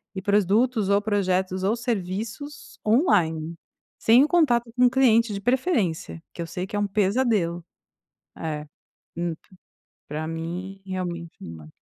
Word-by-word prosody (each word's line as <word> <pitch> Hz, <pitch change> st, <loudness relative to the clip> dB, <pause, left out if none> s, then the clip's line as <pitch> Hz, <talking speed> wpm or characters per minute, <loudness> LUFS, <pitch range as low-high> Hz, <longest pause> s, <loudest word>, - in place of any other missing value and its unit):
e 190 Hz, -, -3 dB
produtos, 210 Hz, +2 st, +2 dB
ou 200 Hz, +1 st, +4 dB
projetos, 190 Hz, -3 st, 0 dB
ou 205 Hz, +4 st, +2 dB
serviços 230 Hz, +4 st, -4 dB
on-line. 170 Hz, -, +2 dB, 0.4 s
Sem 235 Hz, +4 st, +6 dB
o -, -, +2 dB
contato 245 Hz, -9 st, +2 dB
com 250 Hz, 0 st, +5 dB
o -, -, +3 dB
cliente, 230 Hz, -4 st, +3 dB
de 200 Hz, -, -4 dB
preferência, 235 Hz, -, 0 dB
que -, -, -6 dB
eu 165 Hz, -, -4 dB
sei 180 Hz, +2 st, -4 dB
que -, -, -6 dB
é -, -, +1 dB
um 205 Hz, -, +1 dB
pesadelo. 200 Hz, -4 st, +1 dB, 0.7 s
É, 155 Hz, -2 st, -4 dB, 0.5 s
hum 170 Hz, -1 st, -2 dB
p 185 Hz, -, -23 dB, 0.5 s
pra 155 Hz, +2 st, -4 dB
mim 175 Hz, +4 st, -5 dB
realmente 175 Hz, -3 st, -4 dB
uma 80 Hz, -2 st, -9 dB
200 Hz, 145 wpm, -25 LUFS, 170-235 Hz, 0.7 s, Sem